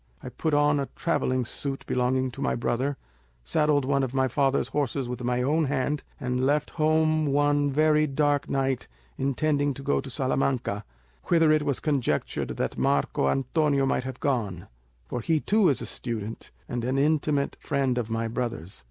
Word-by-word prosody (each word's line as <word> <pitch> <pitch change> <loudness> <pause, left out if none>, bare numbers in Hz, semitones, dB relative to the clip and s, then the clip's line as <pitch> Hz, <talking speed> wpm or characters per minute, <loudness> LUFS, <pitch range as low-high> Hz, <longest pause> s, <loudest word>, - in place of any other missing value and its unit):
I - - -5
put 155 -2 -1
on 145 0 +3
a 140 - -3
travelling 130 -7 0
suit 135 +3 -5
belonging 130 +1 0
to - - -9
my - - +1
brother, 130 +4 -1 0.5
saddled 145 - +2
one 140 0 +2
of 130 -1 -2
my 130 0 +3
father's 135 +1 +1
horses 140 -2 -1
with 125 0 -5
my 125 +1 0
own 155 +4 +2
hand, 145 +1 -1 0.2
and 125 0 -1
left 145 +2 +1
home 155 0 +2
one 145 0 +2
very 155 +1 +3
dark 145 0 +1
night, 135 -2 0 0.3
intending 145 +1 +1
to 135 - -8
go 145 -1 +1
to 135 - -9
Salamanca, 130 -5 -1 0.4
whither 165 -2 +4
it 155 0 +4
was 140 -3 0
conjectured 135 - -1
that - - -2
Marco 70 -1 +1
Antonio 140 - +1
might 135 - 0
have 130 0 -6
gone; 105 - -1 0.4
for 115 - -4
he 160 +6 +1
too 205 +3 +3
is 140 - 0
a - - -4
student, 115 -2 -5 0.2
and 120 -1 -3
an 130 +3 0
intimate 145 0 +1
friend 135 -3 0
of 115 -2 -3
my 115 0 -1
brother's. 115 -7 -4
135 Hz, 175 wpm, -26 LUFS, 125-145 Hz, 0.5 s, whither